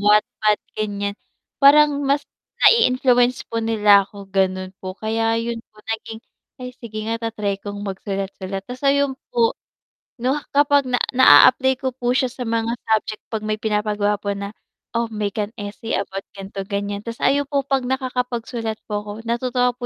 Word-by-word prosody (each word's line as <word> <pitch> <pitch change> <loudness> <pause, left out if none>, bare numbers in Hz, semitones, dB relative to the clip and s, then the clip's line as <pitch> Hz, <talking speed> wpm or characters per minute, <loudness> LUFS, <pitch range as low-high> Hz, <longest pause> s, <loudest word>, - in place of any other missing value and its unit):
wattpad 210 +1 +3 0.2
ganyan. 205 -1 -2 0.5
Parang 295 +1 +7
mas 280 +1 +1 0.4
nai-influence 255 - +4
po 230 - 0
nila 210 -3 +5
ako 200 -1 -11
ganon 185 -1 0
po 185 0 -6
kaya 225 +1 0
yun 230 0 -3
po 215 - -35
naging, 225 0 -5 0.4
"Ay 250 0 -7
sige 220 -4 -7
nga 230 +1 -2
ta-try 205 -3 -3
kong 205 0 -6
magsulat-sulat." 195 0 -4
Tas 250 +4 -8
ayun 280 0 +2 0.2
po, 475 -1 +2 0.7
'no, 260 +5 0
kapag 285 -2 +3
na 250 - +2 0.2
naa-apply 260 0 +7
ko 260 -1 -3
po 245 -1 -3
siya 255 +1 +2
sa 250 - -11
mga 230 -1 -1 0.2
subject 215 -1 0
'pag 215 -1 -4
may 215 0 -1
pinapagawa 210 -1 0
po 200 0 -3
na, 200 0 -5 0.5
"Oh, 235 - +1
make 210 0 -3
an 210 +1 -2
essay 205 +2 -5
about 195 0 -3
ganito, 195 0 -6
ganyan." 200 +1 -3
Tas 230 0 -6
ayun 285 0 +3
po 280 0 0
'pag 270 -1 0
nakakapagsulat 245 -3 -3
po 205 -1 -1
ako, 205 - -6 0.2
natutuwa 250 +1 +1
po 245 - -5
225 Hz, 165 wpm, -21 LUFS, 205-255 Hz, 0.7 s, Parang